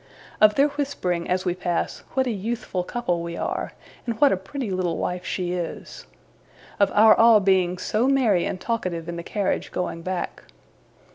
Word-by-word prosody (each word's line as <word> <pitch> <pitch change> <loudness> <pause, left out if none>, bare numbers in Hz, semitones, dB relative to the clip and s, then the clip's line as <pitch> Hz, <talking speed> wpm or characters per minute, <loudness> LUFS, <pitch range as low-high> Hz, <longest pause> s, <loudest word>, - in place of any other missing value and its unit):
Of 210 -1 +6
their 280 +2 +4
whispering, 270 -12 -2
as 185 +1 0
we 180 - +1
pass, 175 -1 -2 0.2
what 265 -1 +2
a 250 - -1
youthful 215 -3 -3
couple 175 -5 -2
we 170 0 -5
are, - - -3 0.3
and 230 -2 -3
what 285 - +6
a - - +3
pretty 200 +5 -5
little 180 -3 -1
wife 180 0 -3
she 180 -1 -3
is. 180 - -6 0.7
Of 200 - +4
our 215 +1 +8
all 225 -1 +6
being 185 -2 +2
so 215 +6 0
merry 240 -10 +3
and 185 - -3
talkative 180 -8 -3
in 170 - -4
the 170 - -5
carriage 200 +3 -2
going 175 -2 -3
back. 185 +1 -4
190 Hz, 180 wpm, -24 LUFS, 180-230 Hz, 0.7 s, our